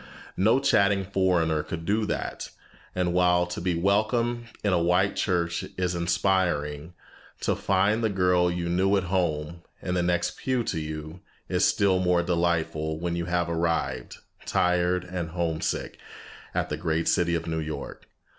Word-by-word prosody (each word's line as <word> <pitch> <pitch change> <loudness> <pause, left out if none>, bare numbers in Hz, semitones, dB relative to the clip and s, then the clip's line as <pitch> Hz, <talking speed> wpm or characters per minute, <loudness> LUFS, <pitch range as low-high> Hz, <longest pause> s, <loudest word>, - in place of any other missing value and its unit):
No 110 +7 +3
chattering 100 -7 +3
foreigner 90 -5 +1
could 80 +1 -6
do 105 +2 +1
that. - - -4 0.5
And 90 -1 0
while 90 -1 +3
to 90 -1 -6
be 90 -1 0
welcome 110 +6 +1 0.2
in 100 -2 +2
a 85 - +2
white 90 +4 +2
church 85 -3 0
is 90 -1 0
inspiring, 85 -3 0 0.5
to - - +1
find 100 +4 +1
the 110 - +2
girl 90 -2 +2
you 85 0 -2
knew 95 +3 +2
at 95 - 0
home, 85 -2 -1 0.2
in 90 - -3
the 90 - +1
next 85 0 0
pew 130 -2 0
to 90 -6 -2
you, 75 +2 -6 0.3
is - - +2
still 95 -2 +3
more 90 -1 +2
delightful 85 -3 0
when 85 0 -2
you 85 -1 -2
have 85 -1 0
arrived, 80 -6 -1 0.3
tired 90 0 +2
and 90 -2 -4
homesick, 80 -2 -2 0.6
at - - 0
the - - -2
great 80 -1 -1
city 85 -2 +2
of 80 0 -3
New 80 -1 -2
York. 75 -3 -6
90 Hz, 160 wpm, -26 LUFS, 85-95 Hz, 0.6 s, No